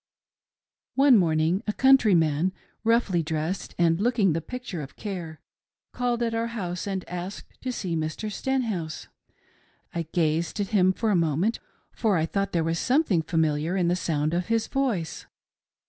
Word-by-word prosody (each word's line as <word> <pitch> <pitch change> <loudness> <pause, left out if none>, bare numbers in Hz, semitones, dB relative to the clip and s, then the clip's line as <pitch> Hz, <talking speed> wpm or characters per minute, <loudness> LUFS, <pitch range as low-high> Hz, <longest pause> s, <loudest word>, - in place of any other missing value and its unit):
One 275 -1 +6
morning, 165 -1 +2
a 210 - 0
countryman, 185 - +4 0.3
roughly 225 -6 +2
dressed 160 +3 -3
and 170 +1 +3
looking 220 -6 +3
the 165 - -1
picture 230 -2 -6
of 135 - -9
care, 175 -7 -6 0.5
called 245 -1 0
at 230 -1 -1
our 230 +1 0
house 185 -6 -4
and 190 -2 -3
asked 180 +2 -7
to 255 - -2
see 185 -8 -3
Mr. 160 +7 -3
Stenhouse. 220 -11 -2 0.8
I 170 -2 -3
gazed 165 +3 0
at 200 -2 -1
him 185 -3 +4
for 220 +3 0
a - - +3
moment, 170 +6 +1 0.3
for 215 -5 +1
I 160 - +1
thought 195 +4 -1
there 170 -2 +1
was 165 +1 -1
something 255 - +2
familiar 160 +2 0
in 175 -2 +2
the 175 - +2
sound 155 -3 -1
of 175 +1 -1
his 225 -1 +1
voice. 240 -12 -2
180 Hz, 160 wpm, -26 LUFS, 165-225 Hz, 0.8 s, One